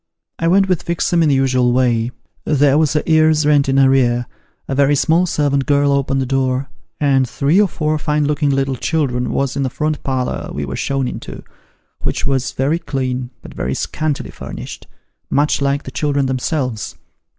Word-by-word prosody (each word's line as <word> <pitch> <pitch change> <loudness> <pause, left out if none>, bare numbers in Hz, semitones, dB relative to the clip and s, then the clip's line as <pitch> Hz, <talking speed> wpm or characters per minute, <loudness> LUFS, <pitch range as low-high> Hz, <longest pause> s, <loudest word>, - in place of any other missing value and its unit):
I 165 - 0
went 195 +3 +4
with 180 -3 0
Fixem 170 0 0
in 160 - +3
the 140 - +3
usual 130 -2 +2
way 120 -2 +1 0.3
there 145 -2 +3
was 155 -1 +1
a 150 - +1
year's 155 -1 +3
rent 145 -2 +3
in 135 - +2
arrear; 130 -3 +3 0.4
a - - -2
very 140 +1 +3
small 165 +5 +2
servant 140 -4 0
girl 145 -1 +3
opened 135 -1 +1
the 135 - 0
door, 130 +1 -1 0.3
and 135 -3 +2
three 150 - +2
or 205 - +3
four 155 -3 -1
fine 150 0 0
looking 150 0 0
little 135 -1 0
children 130 -4 -1
was 135 -2 -1
in - - -1
the 130 - 0
front 150 +3 -2
parlour 130 -2 -2
we 75 0 -4
were 65 - -5
shown 135 -2 -1
into, - - -7 0.6
which - - -2
was 135 -1 0
very 145 +6 0
clean, 130 -5 -3
but - - -11
very 65 +1 -3
scantily 155 -2 -3
furnished, - - -8 0.4
much 145 0 +1
like 140 +1 0
the 130 - -8
children 140 0 0
themselves. 130 -3 -2
140 Hz, 185 wpm, -18 LUFS, 130-150 Hz, 0.6 s, went